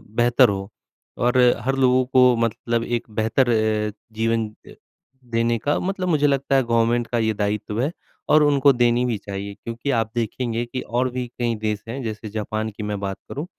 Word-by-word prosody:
बेहतर 120 -1 +5
हो 95 -1 -3 0.5
और 125 +1 +1 0.3
हर 135 +1 +1
लोगों 130 -1 +3
को 125 -1 +5
मतलब 115 0 -1
एक 120 -1 -3
बेहतर 115 +4 +1 0.6
जीवन 115 0 0 0.2
अ, - - -12 0.5
देने 115 -1 0
का 145 +6 0
मतलब 185 0 -2
मुझे 150 -3 +3
लगता 140 -1 +1
है 135 - +4
गवर्नमेंट 115 0 +1
का 120 - -1
ये 110 -1 +1
दायित्व 105 +1 -2
है। 140 +5 0 0.4
और 150 0 +6
उनको 145 -1 +5
देनी 120 0 +2
भी 120 -3 -1
चाहिए 100 0 -6
क्योंकि 115 +6 -5
आप 110 -1 -2
देखेंगे 120 0 -2
कि 125 +2 -5
और 125 +2 -1
भी 125 0 -3
कई 120 -1 0
देश 105 -1 -2
हैं 125 +4 -5
जैसे 110 -1 -5
जापान 110 +1 -3
की 105 0 -8
मैं 105 -1 -3
बात 95 -1 -4
करूँ, 145 +4 -4
120 Hz, 185 wpm, -22 LUFS, 110-130 Hz, 0.6 s, और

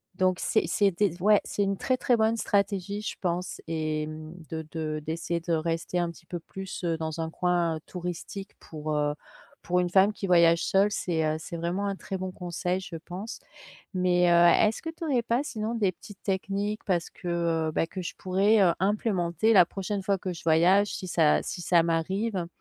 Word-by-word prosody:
Donc, 185 -1 +1
c'est - - +1
c'était 195 +4 +2
s 175 -1 -8
ouais 210 +1 +5
c'est 205 - -1
une 195 0 0
très, 255 - +1
très 245 -1 +2
bonne 220 +1 +2
stratégie, 200 -2 0
je 215 - -4
pense 180 0 -2
et 155 -1 -2
mmh, 155 +1 -8 0.2
de 160 -1 -5
de 155 -2 -3
d'essayer 165 +1 -2
de 170 0 -2
rester 165 +2 -1
un 170 -1 0
petit 170 - -17
peu 175 +1 -5
plus, 190 +3 -8
heu, 165 -2 0
dans 160 0 -3
un 160 - -2
coin 170 -1 0
touristique. 180 +3 -6
Pour, 155 -1 -5
heu, 145 0 +1 0.5
pour 180 0 +1
une 180 -1 +1
femme 195 +3 +5
qui 205 - -5
voyage 170 -2 +5
seule, 200 +2 +3
c'est, 170 -5 -1
heu, 155 0 +1
c'est 165 +2 -7
vraiment 175 +4 -2
un 200 -1 -1
très 190 0 -5
bon 185 0 -4
conseil, 180 +1 -2
je 170 - -8
pense. 185 +7 -7 0.5
Mais, 180 -1 +3
heu, 170 +4 +6
est-ce 215 - -2
que 325 - -5
tu 325 +1 -6
aurais 260 -5 +2
pas 235 +4 +1
sinon, 225 -4 -3
des 205 -5 +2
petites 200 +3 -13
techniques, 200 +2 -2
parce 175 -3 0
que, 180 - -10 0.4
heu - - -4
bah, 160 - +1
que 185 - -6
je 175 - -5
pourrais, 195 +4 +3
heu, 175 -3 +5
implémenter 195 -1 +1
la 185 -4 +8
prochaine 195 +2 -4
fois 195 0 +1
que 185 0 -4
je 170 - -10
voyage? 180 +6 +4
Si 185 - -5
ça 160 -4 +3
si 175 - -5
ça 170 -1 +4
m'arrive, 190 +7 -1
heu. 170 - -2
180 Hz, 210 wpm, -27 LUFS, 165-200 Hz, 0.5 s, la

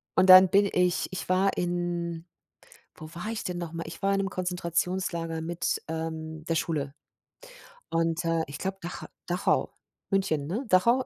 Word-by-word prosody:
Und 185 0 +4
dann 185 0 +10
bin 200 +1 +4
ich 180 0 +2
ich 185 - -5
war 190 +2 +3
in 175 -1 -2 0.7
wo 155 - -10
war 175 +4 -6
ich 225 - -4
denn 180 -1 -3
noch 170 -2 -5
mal? 165 0 -4
Ich 165 - -9
war 195 0 +2
in 195 - +1
'nem 195 0 -1
Konzentrationslager 175 -2 -2
mit, 170 +1 -2
ähm, 160 -1 -5
der 165 - 0
Schule. 150 -4 -1 1.0
Und, 165 +1 0
äh, 165 -1 +1
ich 140 - -7
glaube 190 0 -3
Dach 175 +1 -6 0.2
Dachau, 180 +1 +1 0.4
München, 160 -8 +1
ne? 210 - -3
Dachau 235 +8 +4
175 Hz, 170 wpm, -28 LUFS, 165-185 Hz, 1.0 s, dann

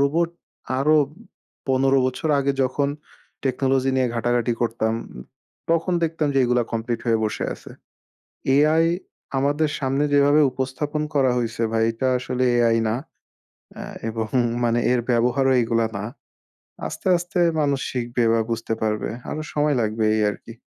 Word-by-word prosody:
robot 160 +5 +2 0.5
আরো 150 +3 +4 0.7
১৫ 135 +1 +3
বছর 130 +5 -2
আগে 140 0 +1
যখন 140 +2 0 0.6
technology 135 0 +1
নিয়ে 130 -1 +2
ঘাটাঘাটি 120 0 +1
করতাম, 115 -1 0 0.8
তখন 165 +2 +1
দেখতাম 160 -2 0
যে - - +3
এগুলো 125 0 +2
complete 115 +1 -2
হয়ে 115 -1 +3
বসে 110 - -2
আসে। - - -14 0.8
AI 155 +3 +4 0.5
আমাদের 145 +3 +1
সামনে 135 +1 0
যেভাবে 145 +1 +5
উপস্থাপন 135 +4 -3
করা 135 -3 +3
হইছে 115 -1 -2
ভাই 115 0 +2
এটা 130 +3 -1
আসলে 130 0 -2 0.2
AI 115 -1 +3
না 110 - 0 0.9
আ - - -5 0.3
এবং 110 0 -2 0.4
মানে 120 0 +2
এর 125 - +3
ব্যবহারও 125 +3 +2
এগুলা 115 0 +1
না। 100 - -4 0.8
আস্তে - - -6
আস্তে 175 +1 -3 0.2
মানুষ 140 -2 +1
শিখবে 120 -1 -1
বা 115 - +3
বুঝতে 115 0 -2
পারবে। 105 -1 -1 0.2
আরো 155 - -3
সময় 150 -1 +2
লাগবে 110 0 -1
এই 110 - +1
আরকি। 115 +2 -8
130 Hz, 140 wpm, -23 LUFS, 115-145 Hz, 0.9 s, যেভাবে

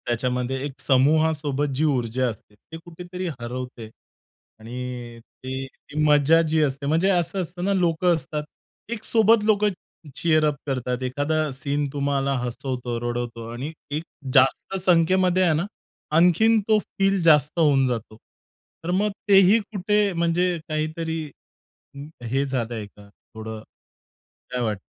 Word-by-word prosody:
त्याच्यामध्ये 125 +2 -1
एक 140 -2 -7
समूहासोबत 145 0 +2
जी 145 - 0
ऊर्जा 130 -3 0
असते 105 -1 -11
ते 160 +10 -12
कुठेतरी 175 +2 -7
हरवते 120 -1 -6 0.7
आणि 120 0 -7 0.2
ती 130 +1 -4
ती 145 +2 -14
मजा 150 +2 +5
जी 155 0 +2
असते 140 0 -2
म्हणजे 165 +6 +2
असं 185 +1 +1
असतं 175 0 -6
ना 200 - +2
लोकं 175 -1 +2
असतात. 150 0 -4 0.5
एक 235 -2 -5
सोबत 225 -1 +4
लोकं 210 -1 +3 0.5
चीअर 155 -2 +2
अप 150 -1 +1
करतात 125 -1 -2
एखादा 145 +5 0
सीन 145 +1 -2
तुम्हाला 140 -1 0
हसवतो, 125 0 -4
रडवतो 120 -1 -4
आणि 130 +6 -5 0.2
एक 150 +2 -2 0.3
जास्त 135 +8 +3
संख्येमध्ये 185 +1 +3
आहे 170 -3 +3
ना 165 +5 0 0.5
आणखीन 180 +7 +5
तो 215 -1 +5
फील 195 -2 0
जास्त 150 0 +4
होऊन 140 -4 +4
जातो. 115 -3 -4 0.7
तर 170 - -2
मग 205 +3 +1 0.2
तेही 195 +2 +7
कुठे 210 -1 0
म्हणजे 170 +1 +1
काहीतरी 160 +1 -2 1.0
हे 135 +4 0
झालंय 120 -5 -3
का 100 0 -17 0.3
थोडं 110 0 -7 0.9
काय 125 0 -2
वाटतं? 110 -4 -1
150 Hz, 135 wpm, -24 LUFS, 125-175 Hz, 1.0 s, तेही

